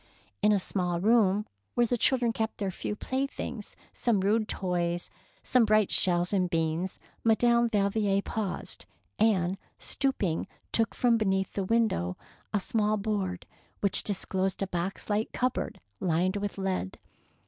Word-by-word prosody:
^^ - - -31 0.4
In 210 +1 +5
a 205 - +4
small 180 -2 -1
room 210 0 +3 0.3
where 240 - +4
the 245 - 0
children 240 -1 +2
kept 220 0 -2
their 195 -2 -2
few 210 - -4
playthings, 260 -3 -4 0.2
some 225 -5 +1
rude 215 +3 +2
toys 175 -3 -1 0.3
and - - -24
some 250 -2 +5
bright 215 -2 +3
shells 175 0 +3
and 185 -2 +2
beans, 165 +2 -1 0.2
Madame 235 +1 +4
Valvier 200 -1 +2
paused, 210 -4 -3 0.3
and, 195 -4 +2 0.2
stooping, 205 - -1 0.2
took 225 -2 +1
from 235 -2 +3
beneath 190 -2 0
the 195 - -1
window 190 - +1 0.3
a 210 - +1
small 215 0 +1
board, 195 -4 -2 0.4
which 200 -2 +4
disclosed 190 -1 -1
a - - -2
box 180 +1 -3
like 215 +1 -1
cup 255 0 +1
board - - -4 0.2
lined 180 +3 +1
with 205 0 -3
lead. 190 - -2
200 Hz, 150 wpm, -29 LUFS, 185-225 Hz, 0.4 s, In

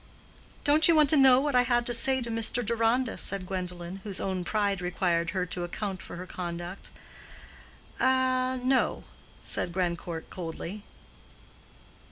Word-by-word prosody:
"Don't 300 +1 +5
you 335 - +5
want 300 -2 +5
to - - +5
know 265 -3 +7
what 290 +1 -1
I 250 - +5
had 240 -1 +1
to 240 - -2
say 260 +2 +3
to 235 - -5
Mr. 230 +1 -1
Deronda?" 230 +2 0
said 195 -1 -1
Gwendolen, 180 -1 -5
whose 200 -3 -2
own 190 -2 -2
pride 200 0 -1
required 175 -1 0
her 185 -1 -1
to 180 0 -4
account 190 +1 -4
for - - -9
her 180 +1 -7
conduct. 175 +1 -6 1.1
"A—no," 260 0 +1 0.4
said 175 - +3
Grandcourt, 170 -2 -3
coldly. 180 +3 -6
205 Hz, 145 wpm, -28 LUFS, 180-255 Hz, 1.1 s, know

